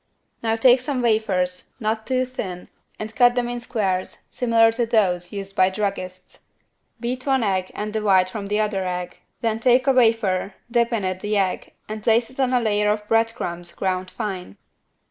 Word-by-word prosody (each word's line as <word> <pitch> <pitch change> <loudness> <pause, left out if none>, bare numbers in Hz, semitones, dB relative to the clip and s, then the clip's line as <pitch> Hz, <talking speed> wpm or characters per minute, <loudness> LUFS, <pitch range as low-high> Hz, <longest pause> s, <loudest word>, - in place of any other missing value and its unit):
Now 225 -1 +1
take 245 +2 +5
some 255 -1 -2
wafers, 190 -6 0
not 220 -1 -2
too 255 -1 +1
thin 190 -8 -6 0.3
and 215 +1 -7
cut 245 0 +5
them 245 -1 0
in 240 0 -3
squares 195 -6 -2
similar 230 -2 +4
to 230 +1 -1
those 180 -6 +1
used 195 -1 -7
by 185 0 +4
druggists. 190 -2 -5 0.5
Beat 250 +3 -4
one 265 -3 +2
egg 190 -3 0
and 210 0 -4
the 220 - -1
white 190 -3 +4
from 200 +1 -5
the 210 +1 0
other 210 -3 0
egg, 180 0 -4 0.2
then 225 -1 0
take 250 +2 +4
a 275 - +5
wafer, 225 -6 +2 0.2
dip 235 0 +2
it 225 -4 -1
in 185 0 -1
the 210 +2 -1
egg 190 -2 -1
and 215 0 -5
place 230 +2 +2
it 260 - -15
on 260 -1 +2
a 250 - +3
layer 210 -2 +2
of 210 0 -3
bread 225 +1 +2
crumbs 175 -5 -5
ground 185 -1 -2
fine. 190 - -5
215 Hz, 190 wpm, -23 LUFS, 190-235 Hz, 0.5 s, take